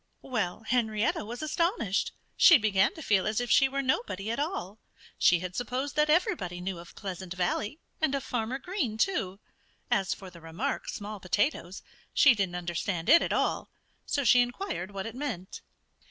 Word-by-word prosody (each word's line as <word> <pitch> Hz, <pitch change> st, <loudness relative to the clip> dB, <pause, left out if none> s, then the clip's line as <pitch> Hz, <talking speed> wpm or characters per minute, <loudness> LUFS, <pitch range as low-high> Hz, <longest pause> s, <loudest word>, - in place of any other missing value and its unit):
Well, 215 Hz, -6 st, -2 dB
Henrietta 220 Hz, -3 st, 0 dB
was 240 Hz, +7 st, -6 dB
astonished. 310 Hz, -, 0 dB, 0.2 s
She 335 Hz, -, +8 dB
began 210 Hz, -, +2 dB
to 320 Hz, -, -8 dB
feel 200 Hz, -5 st, +2 dB
as 215 Hz, +1 st, 0 dB
if 245 Hz, -1 st, -2 dB
she 270 Hz, -1 st, +5 dB
were 275 Hz, +1 st, -2 dB
nobody 215 Hz, -5 st, -1 dB
at 235 Hz, -, -2 dB
all. 225 Hz, -, -3 dB, 0.4 s
She 175 Hz, -1 st, +5 dB
had 185 Hz, 0 st, -5 dB
supposed 255 Hz, +4 st, -3 dB
that 300 Hz, 0 st, +3 dB
everybody 300 Hz, -, +1 dB
knew 180 Hz, -1 st, -4 dB
of 170 Hz, -, -13 dB
Pleasant 185 Hz, -2 st, -6 dB
Valley 205 Hz, -, -1 dB, 0.2 s
and 305 Hz, -3 st, +2 dB
of 275 Hz, -, -2 dB
Farmer 240 Hz, +1 st, -2 dB
Green, 275 Hz, -, -3 dB
too. 205 Hz, -, 0 dB, 0.5 s
As 195 Hz, -2 st, +1 dB
for 190 Hz, -2 st, -11 dB
the 170 Hz, -1 st, -14 dB
remark, 170 Hz, -, -3 dB
"small 210 Hz, 0 st, -6 dB
potatoes," 190 Hz, -, -1 dB, 0.3 s
she 275 Hz, -, +7 dB
didn't 195 Hz, -5 st, -1 dB
understand 175 Hz, 0 st, -3 dB
it 335 Hz, -, +8 dB
at -, -, -1 dB
all. -, -, 0 dB, 0.4 s
So 280 Hz, -, 0 dB
she 245 Hz, +1 st, +6 dB
inquired 245 Hz, -, -3 dB
what 195 Hz, -1 st, -5 dB
it 225 Hz, -, -5 dB
meant. 245 Hz, -9 st, -5 dB
215 Hz, 175 wpm, -29 LUFS, 185-275 Hz, 0.5 s, She